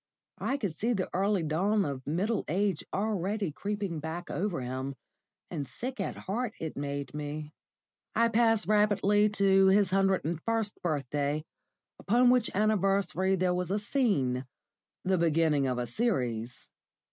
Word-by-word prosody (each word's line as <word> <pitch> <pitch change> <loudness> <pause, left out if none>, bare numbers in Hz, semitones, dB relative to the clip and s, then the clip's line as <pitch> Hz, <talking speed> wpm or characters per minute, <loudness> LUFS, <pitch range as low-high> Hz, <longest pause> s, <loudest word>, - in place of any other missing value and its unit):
I 275 - 0
could 200 - -3
see 235 +6 0
the 190 -4 -2
early 195 0 +1
dawn 195 +7 +1
of 135 -2 -5
middle 195 +9 0
age 190 0 0
already 200 -2 -1
creeping 200 0 -3
back 160 +3 -5
over 190 -3 -1
him, 130 +2 -4 0.6
and 145 -6 -3
sick 255 - -6
at 195 - -3
heart 225 +3 -3
it 160 -1 -4
made 140 0 -4
me. 150 +1 -5 0.6
I 230 0 +4
pass 225 -1 +3
rapidly 210 0 +3
to 195 -2 +4
his 195 -1 +4
hundred 195 -2 +2
and 165 0 -2
first 225 -1 -1
birthday, 145 -1 -1 0.5
upon 245 +4 +4
which 250 -3 +3
anniversary 195 -2 +2
there 185 -1 +1
was 180 -1 -2
a 200 - +1
scene 170 - 0 0.6
the 185 -1 +1
beginning 160 -4 +2
of 125 -1 -1
a 125 - -1
series. 120 - -2
190 Hz, 145 wpm, -30 LUFS, 150-210 Hz, 0.6 s, I